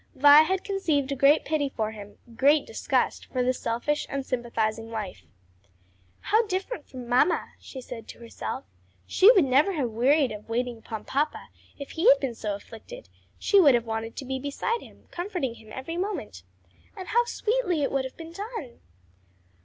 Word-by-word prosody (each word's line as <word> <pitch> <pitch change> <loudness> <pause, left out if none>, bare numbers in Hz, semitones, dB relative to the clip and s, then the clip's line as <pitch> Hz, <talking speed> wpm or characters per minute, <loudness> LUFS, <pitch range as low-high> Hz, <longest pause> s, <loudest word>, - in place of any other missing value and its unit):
Vi 290 +2 +8
had 370 +4 0
conceived 315 -9 0
a - - 0
great 275 +3 +4
pity 300 -3 0
for 220 -4 -3
him, 205 -1 -11 0.2
great 285 +4 +4
disgust - - -1
for 255 -1 -1
the 255 +1 +2
selfish, 245 +5 -2
unsympathizing 235 -4 -2
wife. 215 -4 -6 0.9
"How 440 +2 +3
different 380 -2 -4
from 255 -2 -9
mamma!" 250 +8 +2
she 260 - -9
said 240 -2 -9
to - - -10
herself. 235 -1 -6 0.4
"She 390 - +6
never 285 -1 +4
would 380 - -3
have 255 -5 0
wearied 265 +5 +3
of 210 +1 -9
waiting 240 0 -2
upon 220 -1 -7
papa 295 +3 -2 0.3
if 280 - -8
he 345 +9 +3
had - - +7
been 260 -3 -2
so 210 -3 -3
afflicted; 230 - -12 0.3
she 400 - +4
would 285 -7 +6
have 235 -1 0
wanted 225 0 -4
to 270 - -6
be 265 0 -3
beside 285 - -2
him, - - -16
comforting 350 - -3
him 220 -2 -16
every 330 +6 -6
moment. 360 - -4 0.6
And 375 - -7
how 475 +2 +3
sweetly 430 -9 0
it - - 0
would 270 -1 0
have 260 - -8
been 330 0 -9
done." 400 - -7
275 Hz, 175 wpm, -26 LUFS, 235-345 Hz, 0.9 s, Vi